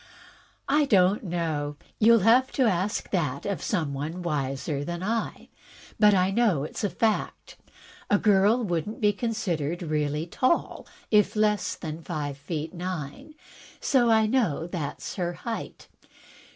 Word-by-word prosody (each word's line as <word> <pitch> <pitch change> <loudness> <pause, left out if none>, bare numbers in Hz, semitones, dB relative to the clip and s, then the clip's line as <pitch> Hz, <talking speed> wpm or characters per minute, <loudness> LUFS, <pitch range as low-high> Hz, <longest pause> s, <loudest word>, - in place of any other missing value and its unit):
" - - -28 0.2
I 295 +2 +3
don't 195 -4 +3
know. 160 -5 -2 0.2
You'll 230 0 +6
have 250 +3 +5
to 265 - +2
ask 200 -2 0
that 150 -8 -1
of 200 -1 -2
some 160 -9 -1
one 155 +6 -4
wiser 140 -2 -2
than 175 +3 -5
I. 225 +3 -3 0.5
But 210 -1 +6
I 185 +1 +2
know 200 -10 +2
it's 155 - -6
a 205 - +1
fact. 220 +2 -1 0.5
A 205 - +4
girl 210 +3 +3
would 170 -5 -1
n't 220 - -8
be 210 -2 +3
considered 175 -8 -2
really 150 -1 -1
tall 255 - 0 0.2
if 210 0 +4
less 210 -2 +1
than 160 0 -6
five 145 -5 -4
feet 155 +3 -5
nine. 180 - -6 0.4
So 250 -4 +3
I 220 -1 +5
know 215 - +1
that's 170 -1 -5
her 175 -2 -1
height. 225 +6 -6
180 Hz, 150 wpm, -26 LUFS, 155-215 Hz, 0.5 s, You'll